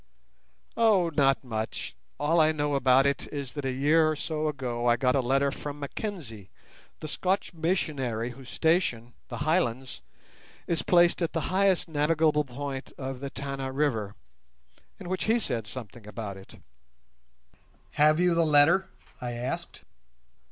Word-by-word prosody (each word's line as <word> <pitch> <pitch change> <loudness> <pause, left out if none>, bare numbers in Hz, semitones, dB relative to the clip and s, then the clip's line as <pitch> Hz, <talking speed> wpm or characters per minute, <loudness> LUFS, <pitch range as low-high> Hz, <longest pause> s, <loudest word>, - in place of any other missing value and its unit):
"Oh, 205 -7 +3
not 135 -4 +3
much. 110 -3 -4 0.3
All 160 +3 +3
I 155 0 +4
know 145 -1 -1
about 135 0 +4
it 140 0 -1
is 140 -4 -5
that 145 -2 -5
a 130 - 0
year 155 +5 +3
or 155 - 0
so 155 +1 -2
ago 125 -5 -2
I 120 - +5
got 125 +1 +2
a - - +3
letter 135 +3 +2
from 145 +1 -7
Mackenzie, 140 - -6 0.5
the 155 - -5
Scotch 185 +5 -1
missionary, 145 - -1
whose 130 0 -12
station, 140 -9 0 0.2
'The - - -5
Highlands', 145 -5 -1 0.6
is 170 - 0
placed 175 0 +4
at 170 - -1
the 165 - 0
highest 190 -2 +3
navigable 150 0 +2
point 135 +1 -6
of 130 -1 -5
the 140 +1 -5
Tana 135 -1 -5
River, 120 -8 -1 0.8
in - - -8
which 185 +1 -2
he 225 +2 +3
said 120 - -3
something 110 -1 -9
about 105 -2 -6
it." 95 0 -14 1.3
"Have 155 +2 +4
you 180 -1 +3
the 170 0 +3
letter?" 160 +5 +4 0.3
I 120 -1 -3
asked. 120 +2 -5
145 Hz, 150 wpm, -28 LUFS, 125-160 Hz, 1.3 s, I